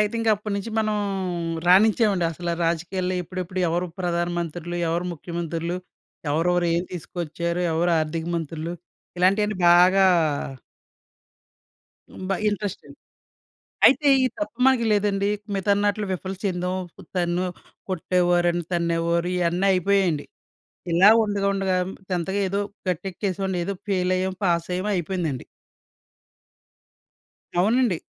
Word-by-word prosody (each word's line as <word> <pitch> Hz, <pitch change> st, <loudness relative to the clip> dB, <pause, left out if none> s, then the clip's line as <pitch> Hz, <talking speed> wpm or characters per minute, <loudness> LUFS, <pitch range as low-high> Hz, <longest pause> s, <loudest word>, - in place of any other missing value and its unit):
అయితే 210 Hz, +2 st, +1 dB
ఇంకా 225 Hz, -1 st, +2 dB
అప్పటినుంచి 205 Hz, +1 st, -4 dB
మనం 215 Hz, -1 st, +1 dB, 0.7 s
రాణించామండసల 185 Hz, -4 st, +3 dB
రాజకీయాల్లో 180 Hz, +3 st, -1 dB
ఎప్పుడెప్పుడు 185 Hz, +1 st, -5 dB
ఎవరు 175 Hz, +2 st, 0 dB
ప్రధానమంత్రులు? 175 Hz, -1 st, -2 dB
ఎవరు 170 Hz, +2 st, -1 dB
ముఖ్యమంత్రులు? 170 Hz, +1 st, -4 dB, 0.5 s
ఎవరెవరు 175 Hz, +3 st, +2 dB
ఏం 170 Hz, -, +1 dB
తీసుకొచ్చారు? 170 Hz, 0 st, -3 dB
ఎవరు 170 Hz, +2 st, +1 dB
ఆర్థిక 160 Hz, +1 st, -3 dB
మంత్రులు? 165 Hz, +1 st, -4 dB, 0.5 s
ఇలాంటివన్నీ 200 Hz, +3 st, +2 dB
బాగా 180 Hz, +3 st, +6 dB, 2.1 s
హ్మ్. -, -, -8 dB
బ -, -, +3 dB, 0.2 s
ఇంట్రెస్ట్ండి. 205 Hz, -1 st, -4 dB, 0.9 s
అయితే 290 Hz, +2 st, +5 dB, 0.2 s
ఈ -, -, +4 dB
తప్పు 310 Hz, -6 st, -4 dB
మనకి 250 Hz, -3 st, +3 dB
లేదండి. 200 Hz, -1 st, +1 dB, 0.3 s
మిగతావన్నట్లు 205 Hz, +2 st, +1 dB
విఫలం 190 Hz, +1 st, -5 dB
చెందాం. 180 Hz, -1 st, -1 dB, 0.4 s
తన్నో, 175 Hz, 0 st, 0 dB, 0.4 s
కొట్టేవారని, 175 Hz, -1 st, +1 dB
తన్నేవారు 170 Hz, 0 st, 0 dB
ఇయన్నీ 180 Hz, +2 st, +1 dB
అయిపోయాయండి. 185 Hz, -4 st, +1 dB, 0.7 s
ఇలా 180 Hz, +5 st, +7 dB
ఉండగా, 205 Hz, -2 st, 0 dB
ఉండగా 190 Hz, -1 st, 0 dB, 0.3 s
10థ్‌గా 185 Hz, +3 st, -1 dB
ఏదో 200 Hz, +2 st, 0 dB, 0.3 s
గట్టెక్కేసేవాడిని. 190 Hz, +1 st, -2 dB
ఏదో 200 Hz, +1 st, -3 dB
ఫెయిల్ 185 Hz, -1 st, +1 dB
అయ్యాం. 185 Hz, 0 st, -2 dB
పాస్ 170 Hz, -2 st, +1 dB
అయ్యామో 185 Hz, +3 st, -1 dB
అయిపోయిందండి. 170 Hz, -6 st, -2 dB, 2.2 s
అవునండి. 220 Hz, 0 st, +3 dB
180 Hz, 100 wpm, -24 LUFS, 170-195 Hz, 2.2 s, ఇలా